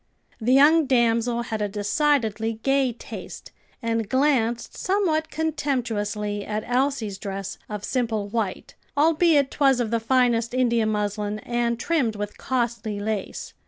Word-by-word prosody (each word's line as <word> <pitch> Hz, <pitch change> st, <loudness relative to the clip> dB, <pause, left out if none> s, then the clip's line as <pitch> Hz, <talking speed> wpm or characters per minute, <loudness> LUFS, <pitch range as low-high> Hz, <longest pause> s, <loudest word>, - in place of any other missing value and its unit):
The 235 Hz, +2 st, 0 dB
young 300 Hz, +3 st, +6 dB
damsel 235 Hz, -1 st, +2 dB
had 220 Hz, -2 st, -4 dB
a 205 Hz, -, 0 dB
decidedly 225 Hz, +1 st, +1 dB
gay 270 Hz, -2 st, +2 dB
taste, 235 Hz, -, -9 dB, 0.3 s
and 225 Hz, -2 st, -1 dB
glanced 255 Hz, -4 st, +1 dB
somewhat 360 Hz, -5 st, 0 dB
contemptuously 225 Hz, -10 st, -2 dB
at 215 Hz, +1 st, -3 dB
Elsie's 245 Hz, -5 st, 0 dB
dress 195 Hz, -1 st, -5 dB
of 210 Hz, -1 st, -5 dB
simple 225 Hz, -5 st, -1 dB
white, 210 Hz, -3 st, -3 dB, 0.2 s
albeit 310 Hz, -2 st, +4 dB
'twas 270 Hz, -3 st, +3 dB
of 230 Hz, -2 st, -1 dB
the 230 Hz, -, +2 dB
finest 235 Hz, 0 st, +2 dB
India 235 Hz, -3 st, +2 dB
muslin 210 Hz, 0 st, -1 dB
and 240 Hz, -1 st, -1 dB
trimmed 260 Hz, -8 st, 0 dB
with 205 Hz, 0 st, -5 dB
costly 235 Hz, -4 st, -2 dB
lace. 210 Hz, -1 st, -4 dB
235 Hz, 130 wpm, -24 LUFS, 215-270 Hz, 0.3 s, young